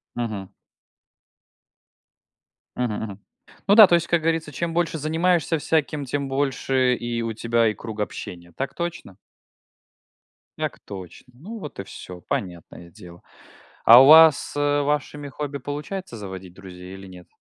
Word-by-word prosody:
Мгм. 110 -5 -5 2.2
Мгм 120 -4 -1
мгм. 100 -2 -7 0.5
Ну 205 - +5
да, 215 -3 +10
то 175 - +4
есть 170 0 0
как 170 -2 +1
говорится, 160 -1 -1
чем 165 +4 -3
больше 170 -1 0
занимаешься 165 +2 +1
всяким, 150 -1 -1
тем 140 +2 -3
больше 135 -2 0
и 120 -1 -4
у 115 -1 -3
тебя 115 +1 +1
и 105 - 0
круг 110 +1 -9
общения. 85 -4 -6
Так 135 - -4
точно? 170 - -6 1.4
Так - - -4
точно. 100 +6 -11
Ну 210 - -9
вот 150 - -9
и 100 - -3
всё. 90 -1 -11
Понятное 85 -1 -6
дело. 90 -3 -14 0.6
А 120 +3 +9
у 135 - +7
вас, 160 -1 +7
э, 145 0 +1
вашими 145 0 -2
хобби 140 +1 -5
получается 145 - -6
заводить 95 -3 -9
друзей, 90 -1 -11
или 95 0 -11
нет? 90 -1 -13
130 Hz, 145 wpm, -23 LUFS, 100-155 Hz, 2.2 s, да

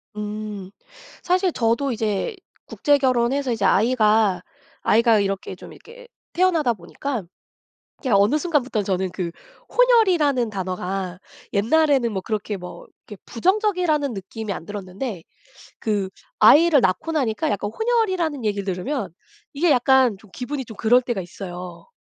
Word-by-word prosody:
음. 210 -2 -6 0.5
사실 365 +1 +2
저도 235 +2 0
이제 220 - -2 0.3
국제결혼해서 265 -2 +1
이제 220 -4 -1
아이가, 215 -3 +3 0.4
아이가 230 0 +4
이렇게 195 -1 -2
좀 - - -12
이렇게 485 +1 -15 0.3
태어나다 335 -9 +2
보니까 215 +5 -5 0.8
그냥 240 -8 +2
어느 220 +10 +3
순간부터 280 -9 0
저는 190 -1 -1
그 180 -2 -3 0.4
혼혈이라는 355 - +3
단어가 185 -1 -4 0.3
옛날에는 260 +2 +2
뭐 190 - -3
그렇게 210 0 -3
뭐 180 -1 -10 0.2
그렇게 205 -3 -11
부정적이라는 355 - +1
느낌이 200 +2 -6
안 175 - -6
들었는데 195 0 -6 0.6
그 205 -3 -1 0.3
아이를 295 +6 +7
낳고 190 - 0
나니까 275 0 0
약간 205 +1 -2
혼혈이라는 375 - 0
얘기를 200 -2 -1
들으면 195 - -3 0.4
이게 315 +3 +2
약간 255 -4 +4
좀 205 +1 -19
기분이 265 +1 -4
좀 220 - -10
그럴 245 +3 +4
때가 240 -5 -3
있어요. 180 - -9
230 Hz, 320 characters per minute, -22 LUFS, 200-290 Hz, 0.8 s, 아이를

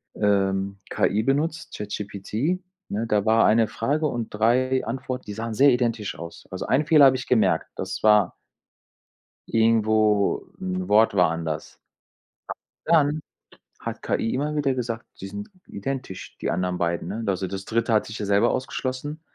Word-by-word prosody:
ähm, 100 -1 +1
KI 105 +2 +1
benutzt, 150 +5 -1
ChatGPT, 105 - -3 0.3
ne, 110 +3 -2
da 105 -2 +2
war 110 +1 +4
eine 110 +1 +4
Frage 150 +9 0
und 120 -4 -3
3 125 +5 +2
Antworten, 130 -1 -4
die 105 - -6
sahen 115 +1 -4
sehr 140 +6 +6
identisch 115 - -1
aus. 85 0 -9
Also, 95 - -4
einen 140 +4 +2
Fehler 155 -3 +7
habe 130 -1 +6
ich 125 - -5
gemerkt. 115 -4 +2
Das 95 +1 -4
war 105 -4 +4 1.1
irgendwo 110 -2 +2
'n 90 0 -3
Wort 110 +1 +5
war 90 -3 +4
anders. 80 -2 -5 1.1
A - - 0
dann 155 -1 +4 0.6
hat - - -6
KI 115 - -1
immer 150 +3 -1
wieder 140 -3 +1
gesagt, 120 -2 -4
die 95 - -6
sind 205 - -7 0.2
identisch, 125 -3 -6
die - - -2
anderen 90 +1 -1
beiden, 85 0 -1
ne? 110 +3 -4
Also, 95 -1 0
das 95 +1 -6
Dritte 115 +1 0
hat 110 - +3
sich 110 - -7
ja 105 - -3
selber 100 +4 +3
ausgeschlossen. 130 +3 -3
110 Hz, 160 wpm, -24 LUFS, 100-130 Hz, 1.1 s, Fehler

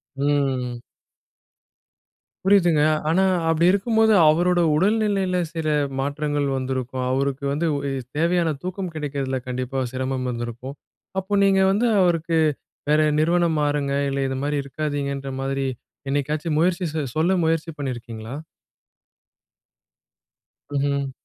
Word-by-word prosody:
ம். 135 -4 0 1.6
புரியுதுங்க, 175 -6 +4 0.3
ஆனா 185 +4 +3 0.3
அப்டி 165 +1 +3
இருக்கும்போது, 220 +2 +3 0.2
அவரோட 175 +3 +3 0.2
உடல்நிலையில 195 0 +1
சில 160 -2 -3 0.3
மாற்றங்கள் 145 +1 -1
வந்திருக்கும், 130 -1 -3
அவருக்கு 135 +1 -1
வந்து 150 +4 -1
உ - - 0
இ - - -3 0.3
தேவையான 170 -1 +2
தூக்கம் 185 0 -4
கிடைக்கிறதில 140 -3 -2
கண்டிப்பா 130 +1 -3
சிரமம் 130 0 -2
வந்திருக்கும். 120 +3 -6 0.4
அப்போ 190 +2 -5
நீங்க 195 -1 +4
வந்து 215 +5 +2
அவருக்கு, 165 -2 +2 0.5
வேற 150 +1 +4 0.2
நிறுவனம் 170 0 +2
மாறுங்க, 145 -1 0 0.2
இல்ல 140 - -2
இது 130 - -3
மாரி 145 0 0
இருக்காதீங்கன்ற 140 -1 -3
மாதிரி, 135 0 -1 0.4
என்னைக்காச்சும் 150 +3 -1
முயற்சி, 180 +1 +1
செ 160 - -1
சொல்ல 160 +4 +2
முயற்சி 165 0 0
பண்ணியிருக்கீங்களா? 120 -3 -6 2.4
ம்ஹம். 140 -1 0
145 Hz, 110 wpm, -23 LUFS, 135-170 Hz, 2.4 s, புரியுதுங்க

